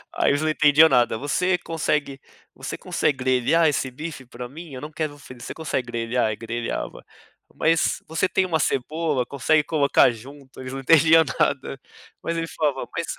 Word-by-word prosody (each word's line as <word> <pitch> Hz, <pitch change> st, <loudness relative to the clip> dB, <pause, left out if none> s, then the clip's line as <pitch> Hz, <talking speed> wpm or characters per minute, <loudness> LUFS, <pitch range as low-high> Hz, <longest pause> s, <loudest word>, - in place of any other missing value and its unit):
aí -, -, +2 dB
eles 145 Hz, +1 st, 0 dB
não 155 Hz, -, 0 dB
entendiam 155 Hz, +1 st, +5 dB
nada. 120 Hz, -2 st, +2 dB
"Você 180 Hz, +8 st, 0 dB
consegue 150 Hz, -4 st, -2 dB, 0.4 s
você -, -, -6 dB
consegue 145 Hz, -, -1 dB
grelhar 130 Hz, +6 st, +2 dB
esse 140 Hz, -3 st, 0 dB
bife 150 Hz, 0 st, -8 dB
pra 120 Hz, 0 st, -9 dB
mim? 160 Hz, +2 st, -11 dB
Eu 130 Hz, -, -7 dB
não 150 Hz, -, -7 dB
quero 155 Hz, -1 st, -4 dB
fri 130 Hz, -3 st, -13 dB
você -, -, -6 dB
consegue 150 Hz, -5 st, -3 dB
grelhar?". 115 Hz, +1 st, -1 dB
Aí 110 Hz, -, -2 dB
grelhava. 115 Hz, +1 st, -5 dB, 0.5 s
"Mas 165 Hz, 0 st, +1 dB
você 160 Hz, +3 st, 0 dB
tem 190 Hz, 0 st, +1 dB
uma 165 Hz, -3 st, 0 dB
cebola? 150 Hz, -1 st, -1 dB
Consegue 140 Hz, +4 st, +1 dB
colocar 145 Hz, -5 st, +3 dB
junto?". 130 Hz, +4 st, -13 dB
Eles 130 Hz, 0 st, -7 dB
não 135 Hz, -, -4 dB
entendiam 160 Hz, +3 st, +6 dB, 0.2 s
nada, 135 Hz, -1 st, 0 dB, 0.4 s
mas 170 Hz, -, -2 dB
ele 165 Hz, 0 st, -2 dB
falava, 145 Hz, -5 st, -2 dB
mas 170 Hz, -, -2 dB
145 Hz, 180 wpm, -23 LUFS, 130-160 Hz, 0.5 s, entendiam